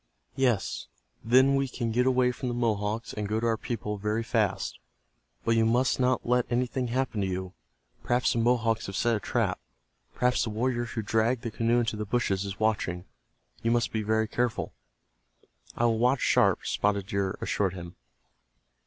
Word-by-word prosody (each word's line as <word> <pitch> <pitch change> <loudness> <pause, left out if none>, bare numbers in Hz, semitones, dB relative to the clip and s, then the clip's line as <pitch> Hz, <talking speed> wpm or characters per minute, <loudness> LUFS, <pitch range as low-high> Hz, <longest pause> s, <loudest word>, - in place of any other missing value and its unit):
Yes, 125 -7 0 0.4
then 130 +4 +5
we 135 0 +1
can 120 -2 -3
get 125 +3 +2
away 125 -1 +3
from 125 +1 -5
the 120 - -2
Mohawks, 110 -1 -1
and 105 -1 -4
go 110 +1 0
to 115 - -2
our 115 -1 +2
people 105 -3 -4
very 105 +3 -1
fast. 110 -4 -1 0.7
But 115 - +3
you 115 - +4
must 120 +3 +2
not 125 0 +1
let 125 0 +1
anything 125 +1 0
happen 120 -3 -1
to 95 - 0
you. 95 0 -4 0.5
Perhaps 125 +1 +1
the 115 - 0
Mohawks 115 -1 +1
have 100 - -6
set 120 +1 +2
a - - -1
trap. - - -1 0.6
Perhaps 125 0 +2
the - - -2
warrior 120 +2 -1
who 115 -2 -4
dragged 115 +3 +1
the 115 - -3
canoe 115 +2 +2
into 115 -2 -2
the 105 - -2
bushes 100 -3 0
is 100 0 -6
watching. 100 -5 0 0.6
You 115 - 0
must 120 0 +1
be 110 - -1
very 110 +1 +1
careful." 120 +1 -1 1.0
"I 120 - +2
will 115 -1 +2
watch 125 +3 +2
sharp," - - +3
Spotted 100 -1 0
Deer 100 -1 -2
assured 95 -2 -1
him. 90 0 -8
115 Hz, 180 wpm, -28 LUFS, 105-125 Hz, 1.0 s, then